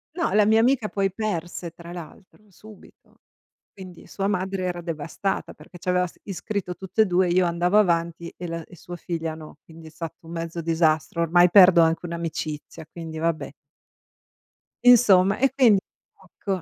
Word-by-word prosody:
No, 340 -2 -1
la 210 0 +4
mia 220 +1 +4
amica 235 -2 +2
poi 195 -1 -1
perse 175 -5 -4
tra 170 +1 -11
l'altro, 180 +4 -12
subito. 210 +3 -18 0.5
Quindi 185 -3 -12
sua 195 0 -3
madre 190 -1 -2
era 175 -1 -3
devastata 165 +3 -4
perché 180 - -15
ci 175 - -15
aveva 180 0 +2
s 175 - -12
iscritto 195 0 -5
a - - -2
tutte 190 +4 0
e - - -1
2, 180 -1 +1
io 180 +1 +3
andavo 175 +3 +1
avanti 170 -3 0
e 175 - -7
l 165 0 -5
e 180 - -15
sua 175 +1 -9
figlia 165 -2 -4
no, 155 -2 -12
quindi 160 0 -14
è - - -10
stato 165 +1 -9
un - - -10
mezzo 165 0 -5
disastro, 160 -1 0
ormai 175 +2 +4
perdo 180 -2 +7
anche 165 +1 +1
un'amicizia, 160 -3 -6
quindi 165 -2 -8
vabbè. 165 0 -2 1.3
Insomma, 200 -6 +6
e 270 +1 +2
quindi 240 -7 +5 0.6
ecco, 190 -3 -3
175 Hz, 175 wpm, -24 LUFS, 165-195 Hz, 1.3 s, perdo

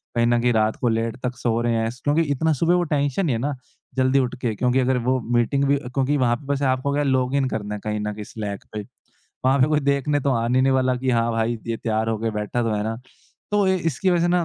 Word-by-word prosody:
कहीं 115 0 +3
न 120 0 +3
कहीं 125 0 +3
रात 110 -1 +2
को 125 - -1
लेट 115 +1 -1
तक 125 0 -2
सो 115 -2 0
रहे 120 0 +1
हैं 115 0 0
स 120 +2 -10
क्योंकि 145 +3 +2
इतना 160 +4 +1
सुबह 165 +5 +2
वो 180 - +2
टेंशन 145 +2 0
नहीं 135 -7 +1
है - - -2
ना, 145 +3 -1 0.4
जल्दी 130 +1 +3
उठ 125 -2 -1
के, 115 -3 0
क्योंकि 125 +4 +1
अगर 130 0 +2
वो 130 0 +2
मीटिंग 120 +4 +2
भी 140 +1 +3
क्योंकि 135 +2 -1
वहाँ 120 -3 +2
पे 130 - -12
बस 140 0 -1
आपको 130 +1 +1
क्या 145 - +1
है, - - 0
लॉग 130 0 +1
इन 135 -1 +2
करना 105 -2 -3
है, - - -6
कहीं 105 0 -2
न 105 0 -3
कहीं 105 0 -7
स्लैक 105 -2 -6
पे। 105 - -3 0.6
वहाँ 135 +2 +4
पे 130 - +5
कोई 150 -1 +2
देखने 140 +1 +1
तो 140 - 0
आने 120 +2 +1
नहीं 135 +1 +3
वाला 130 -1 +2
कि 130 +1 -1
हाँ, 115 -1 +2
भाई, 115 +1 0
ये 115 0 -1
तैयार 110 -1 -1
हो 115 - 0
के 115 +1 -1
बैठा 105 +3 -2
तो 115 -1 0
है 105 - -1
ना? 110 +1 -2 0.5
तो 205 -1 +2
ए 190 - +3
इसकी 165 +1 0
वज़ह 175 -1 +2
से 175 - +2
ना, 175 0 +2
125 Hz, 285 wpm, -23 LUFS, 115-140 Hz, 0.6 s, पे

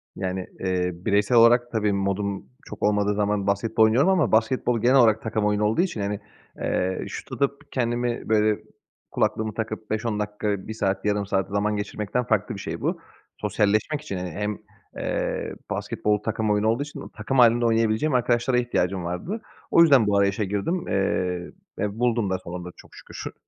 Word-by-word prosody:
Yani, 95 -1 -3
eee, 90 -1 0
bireysel 100 +6 +1
olarak, 120 +1 +5
tabii, 105 -3 +1
modum 100 -2 -1 0.2
çok - - -9
olmadığı 105 0 +2
zaman 105 -1 0
basketbol 110 +3 +2
oynuyorum 125 +11 +4
ama 175 -9 +2
basketbol 115 +1 +2
genel 125 +3 +4
olarak 110 -4 +5
takım 110 -1 -1
oyunu 105 0 +1
olduğu 110 +10 +2
için, 170 - -2
hani, 100 0 -2 0.4
eee, 95 +1 -1
şut - - -8
atıp, 140 +1 -2
kendimi, 120 -2 -1
böyle, 110 -1 +3 0.5
kulaklığımı 110 -1 0
takıp 110 -1 -5
5-10 110 0 -1
dakika, 105 -1 -2
1 110 - -4
saat, 95 -2 -1
yarım 105 -1 +1
saat 95 -1 -1
zaman 105 +1 0
geçirmekten 105 +3 -2
farklı 110 0 0
bir - - -7
şey - - -5
bu. - - -1 0.4
Sosyalleşmek 110 +9 0
için, 100 -11 -5
hani, 90 -2 -4
hem, 105 +3 -3 0.4
eee, - - -2 0.2
basketbol 105 0 0
takım 110 -1 -1
oyunu 105 +1 +2
olduğu 115 +6 +1
için 150 - -9
takım 135 -1 0
hâlinde 120 0 +5
oynayabileceğim 115 +5 +2
arkadaşlara 125 0 +2
ihtiyacım 95 -7 0
vardı. 90 - -4 0.3
O 170 - +6
yüzden 135 -10 +6
bu 100 -1 +3
arayışa 100 +1 +2
girdim, 105 - -2
eee, 90 -2 -1 0.3
ve 105 +2 -3
buldum 115 -4 +1
da 95 - 0
sonunda 90 0 -7
çok - - -17
şükür. - - -8
105 Hz, 170 wpm, -24 LUFS, 100-120 Hz, 0.5 s, O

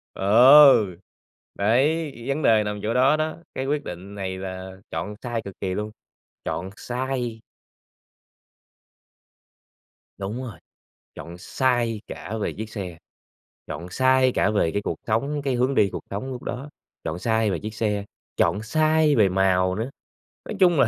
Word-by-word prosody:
Ờ, 120 -1 +7 0.6
đấy, 140 +9 +2
vấn 140 +3 -1
đề 110 -2 +5
nằm 105 0 -3
chỗ 110 +2 0
đó 130 +4 +4
đó, 155 0 -2 0.2
cái 130 - -3
quyết 145 +1 -1
định 95 +1 -8
này 95 -2 -4
là 95 0 -6 0.2
chọn 85 +6 -4
sai 120 -2 -2
cực 100 -2 -9
kỳ 95 -1 -2
luôn, 105 +2 -3 0.5
chọn 90 +2 -3
sai! 125 -2 -3 2.8
Đúng 100 +6 -4
rồi, 120 -5 -8 0.6
chọn 85 +1 -9
sai 120 +1 0
cả 105 +6 -6
về - - -1
chiếc 110 +1 -6
xe, 95 -6 -6 0.7
chọn 85 +1 -6
sai 130 +4 +3
cả 100 - +2
về 100 -6 +1
cái 100 - -1
cuộc - - -3
sống, 140 +7 0
cái 135 -2 -1
hướng 130 +3 +1
đi 100 -5 +4
cuộc - - -5
sống 105 +7 -4
lúc 125 -1 -7
đó, 130 +4 -5 0.3
chọn 80 - -3
sai 110 0 +1
về 90 - -2
chiếc 110 0 -6
xe, 105 -2 -1 0.3
chọn 100 - +2
sai 155 +4 +3
về 105 -4 +4
màu 95 -1 +2
nữa. 110 +5 -3 0.6
Nói - - -5
chung 175 -3 +5
là - - +5
110 Hz, 160 wpm, -24 LUFS, 100-130 Hz, 2.8 s, Ờ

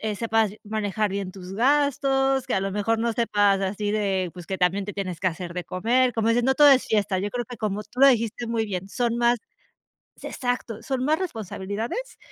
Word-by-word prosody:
sepas 225 -1 +1
manejar 210 -1 -1
bien 195 -1 -4
tus 185 -1 -9
gastos, 270 +1 +2
que 260 - -3
a 190 - +1
lo 195 0 -2
mejor 220 +3 0
no 235 0 +1
sepas 205 -4 +2
así 205 +2 -2
de, 195 -4 0
pues, 175 -1 -10
que 190 +1 -4
también 185 +2 +1
te 205 - -6
tienes 185 -5 -4
que 185 - +1
hacer 170 0 -4
de 180 - -3
comer, 245 +7 +1
como 225 0 +1
dices 235 +1 +2
no 265 +1 +3
todo 295 -1 +7
es 265 -2 +5
fiesta, 205 -3 +1
yo 200 +2 -2
creo 245 -1 -3
que 245 +1 -9
como 210 -1 -2
tú 250 - -11
lo 275 - +8
dijiste 230 -2 +1
muy 225 -1 0
bien, 190 -2 -4
son 235 +2 -1
más 240 0 +3 0.8
se - - -8
exacto, 245 -3 -3
son 260 -1 -2
más 310 +1 +2
responsabilidades, 225 - -5
220 Hz, 215 wpm, -24 LUFS, 195-245 Hz, 0.8 s, lo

